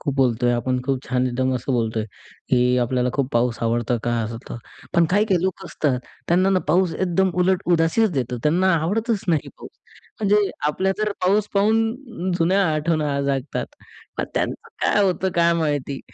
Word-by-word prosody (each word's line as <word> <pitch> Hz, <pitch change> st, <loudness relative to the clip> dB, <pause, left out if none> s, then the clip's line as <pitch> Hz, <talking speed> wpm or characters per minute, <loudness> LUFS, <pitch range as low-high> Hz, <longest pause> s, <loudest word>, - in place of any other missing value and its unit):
खूप 140 Hz, -, -2 dB
बोलतोय 125 Hz, -2 st, +2 dB
आपण 125 Hz, +1 st, -1 dB
खूप 135 Hz, 0 st, 0 dB
छान 125 Hz, 0 st, 0 dB
एकदम 130 Hz, +1 st, 0 dB
असं 125 Hz, +2 st, -2 dB
बोलतोय, 115 Hz, -2 st, 0 dB, 0.4 s
की 125 Hz, 0 st, +3 dB
आपल्याला 125 Hz, +1 st, 0 dB
खूप 135 Hz, -2 st, -1 dB
पाऊस 120 Hz, 0 st, +1 dB
आवडतं 120 Hz, +1 st, 0 dB
का 120 Hz, -, 0 dB
असं 115 Hz, +1 st, -4 dB
तर -, -, -6 dB, 0.4 s
पण 170 Hz, -, +5 dB
काही-काही 200 Hz, -3 st, +2 dB
लोक 190 Hz, +1 st, -2 dB
असतात. 145 Hz, -7 st, -1 dB, 0.3 s
त्यांना 185 Hz, +3 st, +3 dB
ना 190 Hz, -, +3 dB
पाऊस 175 Hz, +1 st, +2 dB
एकदम 190 Hz, +1 st, +1 dB
उलट 185 Hz, +1 st, +2 dB
उदासीच 170 Hz, +6 st, +3 dB
देतो. 125 Hz, -5 st, -2 dB
त्यांना 180 Hz, +5 st, +3 dB
आवडतच 205 Hz, +7 st, 0 dB
नाही 160 Hz, -4 st, +1 dB
पाऊस. -, -, -10 dB, 0.5 s
म्हणजे 205 Hz, -1 st, +3 dB, 0.2 s
आपल्या 190 Hz, +6 st, +1 dB
जर 215 Hz, -1 st, 0 dB
पाऊस 205 Hz, +3 st, +2 dB
पाहून 225 Hz, -1 st, 0 dB
जुन्या 185 Hz, +4 st, +3 dB
आठवण 155 Hz, +1 st, 0 dB, 0.2 s
जागतात. 135 Hz, 0 st, -2 dB, 0.5 s
मग -, -, +1 dB
त्यांचं -, -, -2 dB, 0.2 s
काय 205 Hz, -, +3 dB
होतं 190 Hz, 0 st, +1 dB
काय 170 Hz, 0 st, +4 dB
माहिती, 145 Hz, -3 st, -2 dB
165 Hz, 165 wpm, -22 LUFS, 125-190 Hz, 0.5 s, पण